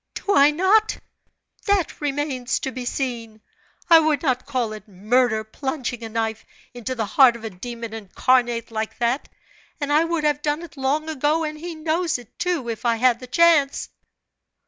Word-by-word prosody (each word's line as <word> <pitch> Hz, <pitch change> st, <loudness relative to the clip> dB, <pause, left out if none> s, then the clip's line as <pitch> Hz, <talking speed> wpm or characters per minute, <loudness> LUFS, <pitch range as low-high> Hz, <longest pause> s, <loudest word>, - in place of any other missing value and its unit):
"Do 405 Hz, -, -1 dB
I 285 Hz, -6 st, +6 dB
not? 380 Hz, +8 st, +3 dB, 0.7 s
That 400 Hz, -6 st, 0 dB
remains 275 Hz, -3 st, -1 dB
to 265 Hz, -, -3 dB
be 255 Hz, -1 st, -6 dB
seen! 235 Hz, -4 st, -4 dB, 0.5 s
I 330 Hz, -2 st, +8 dB
would 310 Hz, -1 st, +1 dB
not 255 Hz, -3 st, 0 dB
call 250 Hz, -6 st, -1 dB
it 215 Hz, -, -10 dB
murder 220 Hz, +3 st, +1 dB
plunging 245 Hz, +1 st, -4 dB
a 225 Hz, -, -5 dB
knife 220 Hz, 0 st, -2 dB, 0.3 s
into 245 Hz, +1 st, -5 dB
the 225 Hz, -3 st, -1 dB
heart 245 Hz, +3 st, +5 dB
of 235 Hz, -, -11 dB
a 225 Hz, -, -5 dB
demon 230 Hz, +4 st, -7 dB
incarnate 235 Hz, +2 st, 0 dB
like 220 Hz, 0 st, -4 dB
that, 240 Hz, +3 st, -1 dB, 0.5 s
and 290 Hz, -1 st, -1 dB
I 305 Hz, +2 st, +5 dB
would 330 Hz, -2 st, -1 dB
have 295 Hz, -1 st, +1 dB
done 295 Hz, +2 st, -1 dB
it 335 Hz, -, -11 dB
long 280 Hz, +3 st, -1 dB
ago 310 Hz, +1 st, 0 dB
and 305 Hz, -1 st, -3 dB
he 340 Hz, +1 st, -6 dB
knows 320 Hz, +1 st, 0 dB
it, 245 Hz, -1 st, -16 dB
too, 350 Hz, -9 st, -1 dB
if 230 Hz, 0 st, -5 dB
I 235 Hz, -1 st, +2 dB
had 240 Hz, 0 st, +3 dB
the 255 Hz, -, -10 dB
chance!" 310 Hz, -1 st, +3 dB
260 Hz, 180 wpm, -23 LUFS, 235-310 Hz, 0.7 s, I